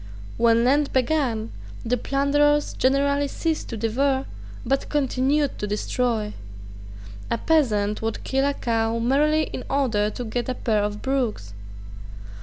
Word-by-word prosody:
When 230 0 +4
Lent 280 +3 +2
began, 255 -4 0 0.3
the 240 +2 +1
plunderers 290 +3 +1
generally 280 +2 +2
ceased 320 +2 -2
to 230 - -5
devour, 265 +5 0 0.4
but 270 +3 0
continued 280 0 0
to 210 - -2
destroy. 215 +1 -1 1.0
A 230 - 0
peasant 215 -10 +1
would 225 0 -3
kill 270 +1 +1
a 285 - -1
cow 225 -1 0
merely 295 +6 +2
in 255 - -6
order 225 -7 +1
to 245 - -6
get 240 +3 -3
a 255 - -1
pair 220 -4 0
of 205 0 -3
brogues. 245 - -2
255 Hz, 135 wpm, -24 LUFS, 225-280 Hz, 1.0 s, When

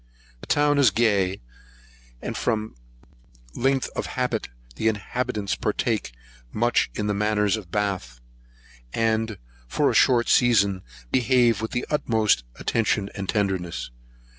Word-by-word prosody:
The - - -12
town 145 0 +3
is 135 -4 +6
gay, 100 -3 +1 0.8
and - - -4
from 110 0 -1 0.8
length 135 +1 +1
of - - -2
habit, 125 - -1 0.3
the 110 - -1
inhabitants 110 0 -2
partake 105 - -1 0.4
much 120 +2 +1
of 105 - -1
the 105 - 0
manners 105 0 +1
of 105 -6 -8
Bath; 95 -12 -2 0.8
and, 110 -1 0 0.3
for - - +1
a - - -3
short 120 -2 +4
season, 100 -6 +3 0.3
behave 120 -3 +3
with 110 - -2
the 120 - -2
utmost 110 - +2
attention 105 -3 0
and 100 -1 -6
tenderness. 95 - -1
110 Hz, 125 wpm, -24 LUFS, 100-120 Hz, 0.8 s, is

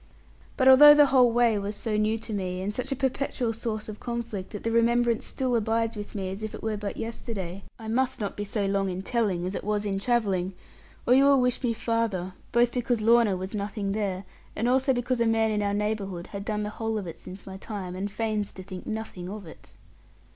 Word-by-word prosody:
But 260 - +3
although 295 +3 +10
the 295 0 +7
whole 255 -3 +5
way 230 -3 +3
was 200 +1 -4
so 215 +1 -2
new 215 +1 +1
to 225 0 -7
me, 185 -2 -2
and 205 +2 -2
such 250 +4 -4
a - - +1
perpetual 265 -3 -1
source 220 -2 -4
of 215 -1 -7
conflict, 235 -5 -4
that 210 - -7
the 230 - 0
remembrance 235 0 +2
still 255 -2 -1
abides 225 +1 0
with 205 0 -7
me, 190 -2 -3
as 195 +2 -6
if 215 -1 -4
it - - -10
were 220 -1 -1
but 205 -1 -5
yesterday, 200 -5 -5 0.2
I 220 - -9
must 255 +3 0
not 205 -2 -3
be 205 - -3
so 205 0 -2
long 195 0 +1
in 185 +1 -4
telling 200 -7 0
as 185 - -3
it - - -4
was 210 0 -1
in 195 -1 -1
travelling, 195 -5 0 0.5
or 245 - +5
you 270 +2 +6
will 280 -1 +6
wish 250 0 +1
me 240 -3 +1
farther; 225 -6 -1 0.2
both 240 0 +3
because 245 -1 0
Lorna 225 -3 +4
was 190 +3 -6
nothing 200 -1 -3
there, 195 -2 -2 0.3
and 225 - 0
also 265 +2 +3
because 245 -1 0
a 230 - +3
man 225 -1 +2
in 210 -1 0
our 200 0 0
neighbourhood 205 -4 -2
had 200 0 -4
done 210 0 -2
the 210 - -3
whole 225 0 -2
of 205 - -4
it 165 - -8
since 190 +2 -10
my 190 0 -8
time, 190 -3 -6
and 195 +2 -3
feigns 215 -1 -2
to 185 - -9
think 185 -1 -9
nothing 215 -5 -5
of 205 -1 -7
it. 160 - -14
215 Hz, 235 wpm, -27 LUFS, 200-235 Hz, 0.5 s, although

